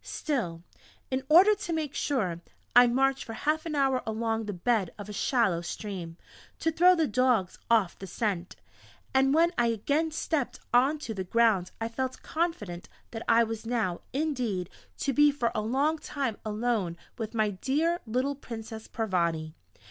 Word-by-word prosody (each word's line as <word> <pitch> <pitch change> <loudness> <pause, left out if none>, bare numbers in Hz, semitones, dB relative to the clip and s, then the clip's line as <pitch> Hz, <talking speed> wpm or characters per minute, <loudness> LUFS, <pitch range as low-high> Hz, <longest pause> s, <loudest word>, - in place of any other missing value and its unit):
Still, 180 - -3 0.5
in 260 0 -1
order 370 +7 +8
to 410 -4 -4
make 310 -3 -2
sure, 190 - -1 0.3
I 245 0 +9
marched 270 +2 +2
for 225 - -7
half 310 +7 -1
an 310 - -3
hour 270 -2 +2
along 225 0 -2
the 205 - -3
bed 195 +1 +1
of 205 0 -8
a - - -6
shallow 205 -6 +1
stream, 175 -2 -6 0.4
to 325 - 0
throw 360 +3 +6
the 325 -2 +2
dogs 240 -6 +1
off 220 -6 +2
the 195 - -7
scent, 185 -2 -2 0.6
and 270 0 +4
when 330 +3 +4
I 240 - +4
again 285 +9 0
stepped 310 -3 -2
onto 265 0 +2
the 190 -3 -3
ground 210 -2 +2
I 225 - -1
felt 260 +3 -4
confident 215 - -3 0.2
that 225 - -5
I 230 +1 +6
was 225 0 -5
now, 220 -7 -1
indeed, 245 - -2 0.3
to 275 - -1
be 295 +2 +6
for 245 -5 -1
a 215 - -1
long 275 +8 +1
time 275 -7 -3
alone 215 -5 -1 0.2
with 225 0 -4
my 215 -2 +2
dear 300 - 0
little 255 +5 0
Princess 225 -5 -8
Parvati. 170 -7 -1
235 Hz, 165 wpm, -28 LUFS, 210-285 Hz, 0.6 s, I